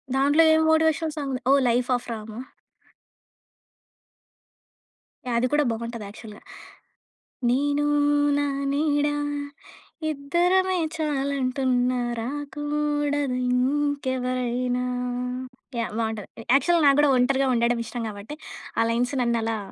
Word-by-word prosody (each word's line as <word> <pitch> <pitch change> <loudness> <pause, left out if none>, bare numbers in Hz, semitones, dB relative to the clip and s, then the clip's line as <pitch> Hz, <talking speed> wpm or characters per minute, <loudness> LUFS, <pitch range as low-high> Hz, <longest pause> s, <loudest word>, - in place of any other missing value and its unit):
దాంట్లో 285 +4 +4
ఏం 315 - +4
motivational 320 0 +2
song 285 -3 -3
ఉంది. 255 - -3
ఓహ్! 280 - +6
'లైఫ్ 245 +1 +1
ఆఫ్ 245 - -4
రామ్' 220 -1 -6
ఆ? - - -5 2.9
యాహ్! 240 - -1
అది 250 - +1
కూడా 295 0 +4
బావుంటది 230 -1 -5
యాక్చువల్‌గా. 210 0 -11 1.1
నేను 290 +3 +1 0.5
నా 290 - +1 0.3
నీడ 290 0 +1 1.0
ఇద్దరమే 355 +6 +1 0.2
చాలంటున్న 270 -4 0 0.3
రాకూడదు 290 0 -2
ఇంకెవరైనా. 255 -2 0 1.0
యాహ్! 230 - -3
బావుంటది 220 0 -4
యాక్చువల్ 335 +3 +3
నాకు 275 0 +5
కూడా 295 -1 +4
ఒంటరిగా 265 +2 +2
ఉండడం 235 0 +1
ఇష్టం 240 +1 -5
కాబట్టి 210 +8 -8 0.4
ఆ - - +5
లైన్స్ 245 +4 0
నన్నలా 230 -2 0
270 Hz, 105 wpm, -25 LUFS, 240-290 Hz, 2.9 s, ఓహ్